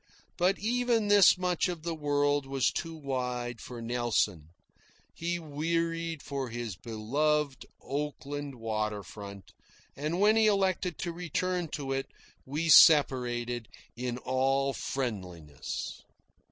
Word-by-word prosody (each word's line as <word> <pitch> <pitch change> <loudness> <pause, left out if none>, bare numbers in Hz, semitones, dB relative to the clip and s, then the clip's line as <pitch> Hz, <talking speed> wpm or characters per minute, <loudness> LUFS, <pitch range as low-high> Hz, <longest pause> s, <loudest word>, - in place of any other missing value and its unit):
But 185 +2 +2
even 235 0 +1
this 205 -2 +7
much 180 +1 +1
of 175 -3 -5
the 170 0 -2
world 145 -2 +1
was 135 -1 +1
too 165 -1 -4
wide 125 -5 -3
for 120 -2 -8
Nelson. 115 -9 0 0.7
He 175 +1 -2
wearied 165 +1 -2
for 135 -3 -4
his 115 -3 -5
beloved 135 - -1 0.2
Oakland 145 -1 -4
water 110 -3 -2
front, 100 +3 -10 0.4
and 155 +6 -2
when 210 +2 +5
he 220 -1 +5
elected 190 -4 +1
to 175 - -3
return 180 +1 -2
to 140 -3 -3
it 135 0 -1 0.4
we 150 +5 -2
separated 125 -7 +5 0.3
in 125 0 -3
all 135 +2 +1
friendliness. 90 - -5
140 Hz, 120 wpm, -30 LUFS, 120-165 Hz, 0.7 s, this